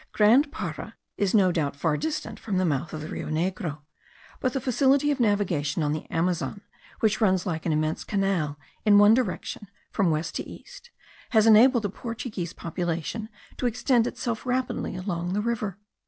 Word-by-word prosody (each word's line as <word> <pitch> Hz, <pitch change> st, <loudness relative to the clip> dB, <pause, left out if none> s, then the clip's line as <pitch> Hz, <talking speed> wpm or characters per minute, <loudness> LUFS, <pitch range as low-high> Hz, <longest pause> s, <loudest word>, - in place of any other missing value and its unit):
Grand 245 Hz, +8 st, +5 dB
Para 320 Hz, -, -6 dB, 0.2 s
is 200 Hz, +1 st, +1 dB
no 190 Hz, -3 st, +5 dB
doubt 150 Hz, -5 st, -1 dB
far 150 Hz, +1 st, 0 dB
distant 315 Hz, -, -3 dB
from 200 Hz, -4 st, -2 dB
the 185 Hz, -, +2 dB
mouth 150 Hz, -1 st, -1 dB
of 155 Hz, -, -5 dB
the 155 Hz, -, -6 dB
Rio -, -, -5 dB
Negro: 165 Hz, -1 st, -2 dB, 0.6 s
but 255 Hz, -1 st, 0 dB
the 270 Hz, -, 0 dB
facility 270 Hz, +3 st, +3 dB
of 285 Hz, -, -1 dB
navigation 180 Hz, -9 st, +1 dB
on 145 Hz, -, +1 dB
the 155 Hz, -, -5 dB
Amazon, 175 Hz, +4 st, -1 dB, 0.4 s
which 215 Hz, 0 st, +2 dB
runs 190 Hz, -4 st, +3 dB
like 165 Hz, -4 st, -3 dB
an -, -, +2 dB
immense 155 Hz, +1 st, 0 dB
canal 190 Hz, -8 st, 0 dB, 0.3 s
in 205 Hz, -1 st, +6 dB
one 205 Hz, +1 st, +7 dB
direction 220 Hz, -3 st, -2 dB, 0.2 s
from 195 Hz, -5 st, +2 dB
west 160 Hz, +1 st, -1 dB
to -, -, -3 dB
east, -, -, -12 dB, 0.4 s
has 220 Hz, -2 st, +4 dB
enabled 230 Hz, +2 st, +6 dB
the 205 Hz, -, 0 dB
Portuguese 220 Hz, -6 st, -5 dB
population 170 Hz, +6 st, -4 dB, 0.3 s
to 250 Hz, -, 0 dB
extend 240 Hz, 0 st, +2 dB
itself 235 Hz, -3 st, -3 dB
rapidly 255 Hz, -5 st, -2 dB
along 180 Hz, -1 st, -3 dB
the 205 Hz, -, 0 dB
river. 215 Hz, -4 st, -2 dB
200 Hz, 175 wpm, -26 LUFS, 170-235 Hz, 0.6 s, one